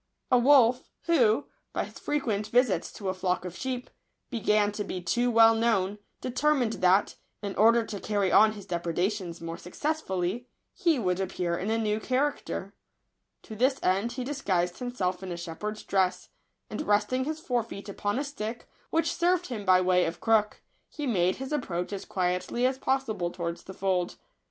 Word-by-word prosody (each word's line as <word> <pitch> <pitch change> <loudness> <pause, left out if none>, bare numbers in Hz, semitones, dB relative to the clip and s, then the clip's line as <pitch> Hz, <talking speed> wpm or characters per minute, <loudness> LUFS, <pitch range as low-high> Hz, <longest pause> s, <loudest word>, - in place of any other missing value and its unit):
* - - -46
WOLF, 250 -1 +5
who, 255 -7 +3 0.3
by - - 0
his - - -12
frequent 220 -8 -1
visits 225 -6 +2
to 195 -3 -4
a - - 0
flock 185 -1 -1
of 180 -1 -6
sheep, 255 -1 -4 0.4
began 210 -3 +2
to 210 0 -3
be 185 -2 -4
too 240 +8 +1
well 225 -1 +7
known, 210 -3 +1 0.2
deter 275 +5 +2
mined 240 -5 0
that, 185 +2 +3 0.3
in 200 -1 -3
order 230 +2 +5
to 210 -3 -6
carry 200 -3 0
on 215 0 +6
his 205 -3 -10
depre 170 -3 -3
dations 180 -3 -1
more 165 0 -6
successfully, 205 - -2 0.3
he 340 -6 +2
would 185 -5 0
appear 180 -2 -1
in 190 +5 -3
a 225 - +1
new 215 -1 0
character. 265 +5 -2 0.7
To 220 - -9
this 260 +4 +2
end 195 +6 +1
he 255 0 -4
dis 280 +2 -5
guised 175 -4 0
himself 195 -8 -2
in 190 -1 -6
a 170 - -4
shepherd's 190 +6 -5
dress; 190 -2 0 0.4
and, - - -4
resting 210 +5 +2
his 310 +1 -3
fore 245 -6 0
feet 210 -3 -9
upon 205 +2 -2
a 280 - 0
stick, 240 -5 -6 0.2
which 325 +1 +1
served 355 +1 +1
him 215 -5 -5
by 185 -1 +5
way 180 0 +3
of 165 - -4
crook, 215 -2 +2 0.3
he 295 - -5
made 185 -7 +2
his 265 +2 -5
approach 180 -10 -2
as 195 - -5
quietly 180 +6 -1
as 260 +1 +1
possible 240 -11 0
towards 170 -1 -5
the 190 - -8
fold. 185 -2 0
210 Hz, 185 wpm, -28 LUFS, 185-250 Hz, 0.7 s, well